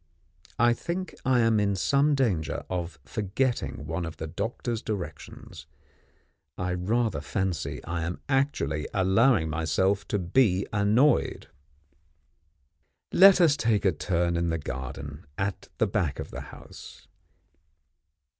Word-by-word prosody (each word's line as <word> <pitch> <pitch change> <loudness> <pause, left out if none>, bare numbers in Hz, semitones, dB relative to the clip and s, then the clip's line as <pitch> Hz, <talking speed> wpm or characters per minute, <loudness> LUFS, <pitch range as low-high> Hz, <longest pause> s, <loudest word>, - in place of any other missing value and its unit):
I 120 +1 +4
think 175 +9 -4
I 125 -2 +4
am 115 -2 +3
in 100 -1 +1
some 140 +9 +2
danger 105 - -1
of 85 -3 -3
forgetting 105 - -2
one 80 +3 -3
of 80 -1 -6
the 80 - -5
doctor's 115 +7 -3
directions; 100 -5 -7 0.9
I 90 0 -2
rather 110 +6 0
fancy 95 -6 -3
I 85 0 -3
am 85 +2 -3
actually 135 - 0
allowing 95 0 +3
myself 90 +5 0
to 105 - 0
be 95 +1 +2
annoyed. 110 +8 +2 1.6
Let 195 0 +8
us 165 -5 +5
take 115 -7 +1
a 95 - +5
turn 85 +1 0
in 85 0 0
the 80 - 0
garden, 70 +2 -7
at 100 -1 -3
the - - +3
back 95 -8 -1
of - - -6
the - - -6
house. - - -12
95 Hz, 125 wpm, -27 LUFS, 85-120 Hz, 1.6 s, Let